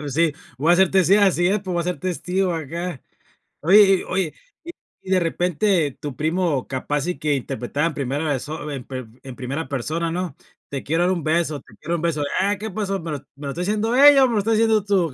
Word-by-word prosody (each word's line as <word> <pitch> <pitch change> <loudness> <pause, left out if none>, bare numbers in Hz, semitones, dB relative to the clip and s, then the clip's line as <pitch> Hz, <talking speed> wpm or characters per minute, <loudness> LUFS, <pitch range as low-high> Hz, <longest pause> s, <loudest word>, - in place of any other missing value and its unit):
Pues, 145 -3 -5
sí, 165 0 +3 0.3
voy 160 +5 +4
a - - +5
ser 190 -1 +4
testig 190 +1 +4
así 185 -3 +3
es, 200 +3 +2
pero 190 -1 -5
voy 170 - +1
a - - -3
ser 180 -3 -2
testigo 185 +1 -1
acá. 165 0 -5 0.6
Oye 195 +4 +7
y - - -6
oye, 185 -4 -2 0.3
y 340 - -7 0.3
y 190 - -7
de 185 - +4
repente 175 -1 +1
tu 145 -3 -5
primo 160 -2 0
capaz 145 +3 -2
y 180 - -2
que 150 -1 0
interpretaba 135 +2 -2
en 160 - -3
primera 140 +3 -2
perso 150 +1 -3
en 135 -3 -5
per 130 -2 -7 0.2
en 130 -2 -9
primera 135 +6 -4
persona, 155 +5 -2
¿no?, 175 -4 -3 0.3
"Te 140 -1 -5
quiero 165 +4 +1
dar 180 - +2
un 170 -4 -4
beso", 155 -2 0
"Te 105 - -19
quiero 170 +3 -4
dar - - +2
un - - -5
beso", 160 -3 0 0.2
"Ah, 200 +2 +1
¿qué 220 +3 -5
pasó?, 195 -1 -2
me 165 -1 -6
lo 145 - -3 0.2
me 140 +1 -7
lo - - -3
está 170 +6 -4
diciendo 215 +5 0
ella, 280 0 +8
o - - +2
me 240 - -2
lo 215 - +2
estás 220 +3 +1
diciendo 220 -2 +3
tú". 190 -7 +1
170 Hz, 245 wpm, -22 LUFS, 145-190 Hz, 0.6 s, ella